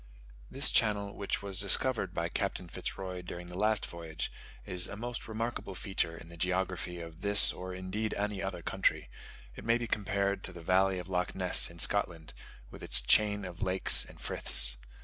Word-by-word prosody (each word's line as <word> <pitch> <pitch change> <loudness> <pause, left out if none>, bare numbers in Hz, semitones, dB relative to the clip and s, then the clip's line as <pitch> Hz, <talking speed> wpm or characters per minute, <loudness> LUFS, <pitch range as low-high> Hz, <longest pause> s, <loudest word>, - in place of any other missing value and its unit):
This - - +2
channel, 100 -2 +2
which 100 0 -2
was 100 -1 0
discovered 100 0 +4
by 85 -2 -2
Captain 95 0 -3
Fitz - - -6
Roy 95 -2 -6
during 90 0 -8
the 90 - -9
last 105 +2 +1
voyage, 80 -2 -6 0.3
is 90 -1 +1
a - - -7
most 120 +1 -5
remarkable 115 -3 -4
feature 90 -4 -2
in 85 - -12
the 85 0 -13
geography 90 0 -2
of 85 0 -10
this, 100 +1 +6
or 95 0 -7
indeed 95 +4 -4
of 100 - -1
any 105 -2 -3
other 95 -3 -5
country: - - 0 0.5
it - - -10
may 115 +1 +2
be 120 - -4
compared 100 -2 -1
to - - -4
the 85 -2 -11
valley 95 +2 +2
of 90 - -6
Lochness 90 -1 +2
in 85 - -14
Scotland, 85 -3 0 0.4
with - - -11
its - - +4
chain 105 - +3
of 90 +1 -9
lakes 95 -1 +3
and - - -15
friths. - - +1
95 Hz, 190 wpm, -31 LUFS, 90-100 Hz, 0.5 s, this